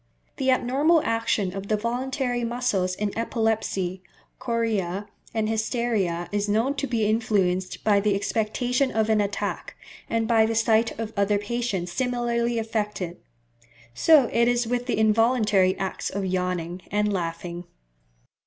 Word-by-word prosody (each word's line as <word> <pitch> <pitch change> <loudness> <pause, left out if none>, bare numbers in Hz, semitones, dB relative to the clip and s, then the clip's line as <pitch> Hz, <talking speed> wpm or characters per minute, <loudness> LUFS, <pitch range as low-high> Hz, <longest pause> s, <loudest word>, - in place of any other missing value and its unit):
The 265 -2 0
abnormal 280 +6 +3
action 225 -6 0
of 195 0 -5
the 215 - +1
voluntary 245 +2 -2
muscles 230 -6 0
in 205 0 -3
epilepsy, 220 -5 -1 0.4
chorea, 210 -5 -1 0.3
and 220 -1 -1
hysteria 220 -6 -1
is 205 0 -1
known 225 +7 +2
to 275 - -1
be 230 -3 0
influenced 200 -4 0
by 205 -2 +4
the 205 0 +1
expectation 245 +6 0
of 220 -2 0
an 215 -1 +3
attack, 200 0 -3 0.3
and 225 -1 0
by 225 -2 +4
the 225 - -1
sight 225 0 +2
of 225 0 -5
other 200 0 +2
patients 205 -4 -2
similarly 240 0 0
affected. 210 -5 -3 0.8
So 290 - +5
it 235 0 +3
is 245 0 +2
with 245 +2 -2
the 245 - 0
involuntary 215 -3 +3
acts 190 -1 -3
of 200 0 -3
yawning 180 -1 -2
and 210 0 +1
laughing. 170 0 -4
220 Hz, 140 wpm, -25 LUFS, 195-235 Hz, 0.8 s, So